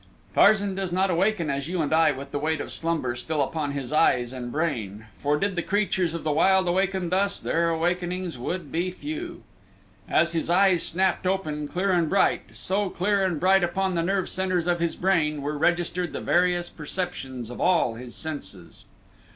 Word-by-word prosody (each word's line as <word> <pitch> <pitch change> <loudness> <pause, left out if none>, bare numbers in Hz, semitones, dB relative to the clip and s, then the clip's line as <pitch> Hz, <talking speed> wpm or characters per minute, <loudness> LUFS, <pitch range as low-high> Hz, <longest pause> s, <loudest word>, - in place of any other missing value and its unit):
Tarzan 205 -2 +4
does 190 -1 -3
not 190 +1 +1
awaken 175 -3 +1
as 140 +1 -3
you 180 +1 -2
and 150 - -1
I 160 -1 +5
with 140 0 -7
the 145 - -2
weight 155 +1 0
of - - -5
slumber 160 -7 -1
still 150 +6 -3
upon 145 +1 -3
his 140 0 -4
eyes 125 -6 +3
and 120 -2 -6
brain, 115 - -3
for 145 +1 +1
did 200 +4 -1
the 175 - 0
creatures 190 -3 0
of 165 - -5
the 155 - 0
wild 190 +4 +3
awaken 190 0 0
thus, 195 +2 +1
their 170 0 0
awakenings 175 +1 -1
would 150 +5 -4
be 175 +3 0
few. 315 - -6 0.7
As 170 - +3
his 165 -1 -2
eyes 185 -1 +4
snapped 185 +1 +1
open, 155 -6 -1
clear 190 +5 0
and 170 -3 +2
bright, 195 -1 +3
so, 195 +1 -1
clear 195 +2 +1
and 180 -5 0
bright 190 +2 +4
upon 190 +2 0
the 170 - 0
nerve 190 +2 0
centers 185 -2 -1
of 175 -1 +1
his 170 -1 -1
brain, 155 -6 +1
were 150 +1 -2
registered 175 +2 0
the - - -3
various 175 0 +2
perceptions 150 -8 -5
of 125 - -7
all 170 -10 +3
his 120 +1 -8
senses. 95 - -7
175 Hz, 190 wpm, -25 LUFS, 150-185 Hz, 0.7 s, I